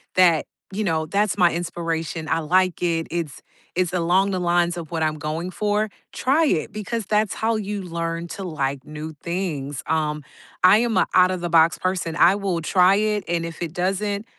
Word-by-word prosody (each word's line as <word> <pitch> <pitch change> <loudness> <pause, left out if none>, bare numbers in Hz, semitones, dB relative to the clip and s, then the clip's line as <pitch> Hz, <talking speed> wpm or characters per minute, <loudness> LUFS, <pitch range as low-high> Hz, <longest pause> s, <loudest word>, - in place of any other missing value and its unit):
that 175 -4 +4 0.3
you 215 - -1
know, 160 -4 0
that's 200 +4 0
my 175 -3 +4
inspiration, 165 -2 -3
I - - +1
like 185 +3 +1
it. 165 -2 0
It's 165 -4 -4 0.3
it's 180 -1 0
along 185 +3 +2
the 185 - -1
lines 175 0 +1
of 165 -1 -7
what 160 -1 -1
I'm 155 0 0
going 155 +4 -3
for. 210 +2 0 0.2
Try 295 +6 +2
it," 175 - 0
because 215 +1 -4
that's 210 -1 +1
how 225 0 0
you 205 -1 -3
learn 170 -1 -3
to 195 - -6
like 140 -6 -3
new 155 +1 -7
things, 155 -6 -3
um, 150 -2 -1 0.4
I 185 +3 +8
am 230 -3 +1
a - - +3
out-of-the-box 175 -3 +4
person. 185 -3 -2
I 180 +4 +5
will 195 -4 -2
try 180 +3 +4
it, 210 -1 0
and 170 -1 -1
if 165 0 -8
it 165 -1 -5
doesn't 200 +3 -1
175 Hz, 185 wpm, -23 LUFS, 165-195 Hz, 0.4 s, I